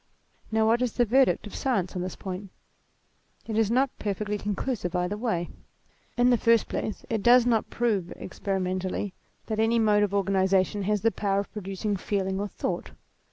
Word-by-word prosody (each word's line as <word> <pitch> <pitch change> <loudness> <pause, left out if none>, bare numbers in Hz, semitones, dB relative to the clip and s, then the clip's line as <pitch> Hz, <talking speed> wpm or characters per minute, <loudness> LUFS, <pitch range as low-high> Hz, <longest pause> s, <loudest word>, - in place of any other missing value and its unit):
Now 220 0 +3
what 230 +2 +3
is 250 -3 0
the 240 - +2
verdict 260 +2 +3
of 210 - -9
science 200 -9 -1
on 180 - -2
this 185 +1 -4
point? 190 +1 -6 1.0
It 220 - -4
is 220 -2 +2
not 260 +3 +2
perfectly 205 0 -2
conclusive 205 -2 -2
either 180 +3 0
way. 210 -7 -2 0.7
In 245 +1 +5
the 240 - +3
first 230 -1 +4
place, 215 - -4
it 225 -2 -1
does 240 +2 +6
not 230 -3 +1
prove, 210 -7 0
experimentally, 185 0 -3 0.3
that 220 -1 -3
any 225 +1 +3
mode 210 -2 +4
of 205 -2 +1
o 200 0 +2
2 195 - -3
198 190 -1 +3
THEISM 190 +1 +1 0.2
organization 205 -2 -4
has 210 -2 +1
the 225 - +4
power 200 -2 0
of 200 - -11
producing 200 0 -3
feeling 190 0 -1
or 205 - -1
thought. - - -4
210 Hz, 195 wpm, -27 LUFS, 190-230 Hz, 1.0 s, does